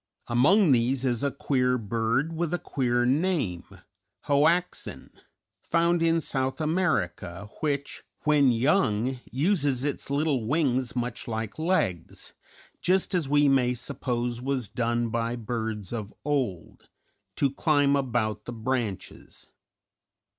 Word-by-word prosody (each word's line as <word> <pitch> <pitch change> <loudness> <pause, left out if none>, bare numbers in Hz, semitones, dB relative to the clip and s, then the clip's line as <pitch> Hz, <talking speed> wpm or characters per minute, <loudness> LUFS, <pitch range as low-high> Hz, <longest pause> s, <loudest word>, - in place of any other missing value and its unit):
Among 150 - +4
these 130 +2 +2
is 120 -2 0
a 140 - +2
queer 125 -2 0
bird 115 +7 -1
with 170 +1 -1
a - - -1
queer 120 -6 0
name, 135 - 0 0.6
Hoactzin, 160 +5 0 0.5
found 170 +1 +1
in 165 0 +3
South 130 -2 -2
America, 105 - -1
which 145 -2 -2 0.2
when 150 -4 +4
young 125 - +1
uses 140 - +1
its 145 -1 -3
little 140 -5 0
wings 130 -4 +1
much 120 0 -3
like 110 +2 -4
legs, 155 - -1 0.5
just 190 +2 +1
as 170 -7 0
we 145 0 +4
may 125 -2 +3
suppose 120 -1 -3
was 130 -3 -1
done 120 +1 -1
by 115 +1 -1
birds 110 -3 -4
of 105 -3 -4
old, 130 - -3 0.5
to 140 -2 +1
climb 145 -1 +3
about 120 -5 -1
the 120 - -6
branches. 115 -3 -4
130 Hz, 120 wpm, -27 LUFS, 115-150 Hz, 0.6 s, Among